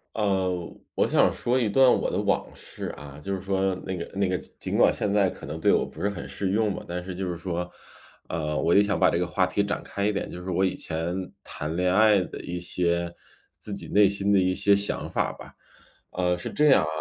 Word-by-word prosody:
呃， 95 -4 0 0.2
我 - - +2
想 - - +4
说 125 +2 0
一 115 -4 +1
段 130 +4 +6
我 - - 0
的 - - -2
往 - - +1
事 - - -7
啊。 70 0 -10
就 100 +4 -2
是 95 - -6
说 95 0 0
那 95 - -3
个 85 - -6
那 100 -1 +2
个， 90 0 0 0.2
尽 - - -2
管 - - +5
现 105 - -1
在 100 -2 +3
可 - - -10
能 75 +2 -5
对 - - +4
我 - - +3
不 80 - -10
是 100 - +1
很 95 -5 -6
适 95 - -3
用 105 0 +1
吧， - - -7
但 90 +1 -4
是 90 0 -6
就 95 +1 -3
是 85 - -3
说， 90 0 -3 0.6
呃， 75 -2 -2
我 85 - +2
就 100 - +7
想 100 -3 0
把 - - +5
这 85 - 0
个 90 - 0
话 95 +1 +2
题 90 +3 0
展 100 0 -2
开 100 - -3
一 105 - +3
点， 100 - -3
就 90 - -7
是 90 - -6
我 95 +1 +2
以 95 - -1
前 85 +3 -4
谈 75 +2 -5
恋 90 +1 +2
爱 105 -1 +6
的 90 - -6
一 90 0 -4
些 85 -1 -1 0.5
自 - - -4
己 - - -6
内 105 0 +6
心 100 0 0
的 100 - +5
一 95 0 +2
些 100 +1 +4
想 100 +1 -1
法 - - 0
吧。 - - -12 0.6
呃， 90 -1 +1
是 90 - -5
这 150 - +3
样 135 - +6
啊， - - -2
95 Hz, 270 characters per minute, -26 LUFS, 85-100 Hz, 0.6 s, 就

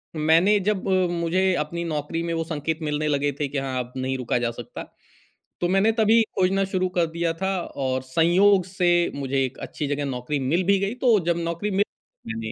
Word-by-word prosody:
मैंने 165 +7 +4
जब 200 -2 -1 0.2
मुझे 175 +2 +1
अपनी 170 +2 -5
नौकरी 155 +1 -3
में 170 0 -2
वो 165 0 -1
संकेत 160 0 -3
मिलने 150 0 -1
लगे 145 -1 +1
थे 145 - 0
कि 140 - -5
हाँ, 135 -2 -2
अब 125 +1 -6
नहीं 130 0 -2
रुका 125 -1 -1
जा 120 - 0
सकता, 120 0 -8 0.8
तो 175 - +2
मैंने 195 +4 +3
तभी 220 +1 +5 0.2
खोजना 190 +1 +2
शुरू 185 0 +1
कर 170 - +4
दिया 170 -1 0
था 190 0 0 0.3
और 130 0 0
संयोग 175 +7 +3
से 180 -1 +1 0.2
मुझे 135 -1 -1
एक 130 - -7
अच्छी 150 - -4
जगह 145 0 -2
नौकरी 135 +2 -3
मिल 170 +7 +2
भी 200 - +3
गई। 200 +3 -1
तो 235 -5 +5
जब 170 -1 +2
नौकरी 170 +5 -2
मिल 200 +1 +2 0.4
मैंने 110 0 -4
165 Hz, 200 wpm, -24 LUFS, 140-190 Hz, 0.8 s, तभी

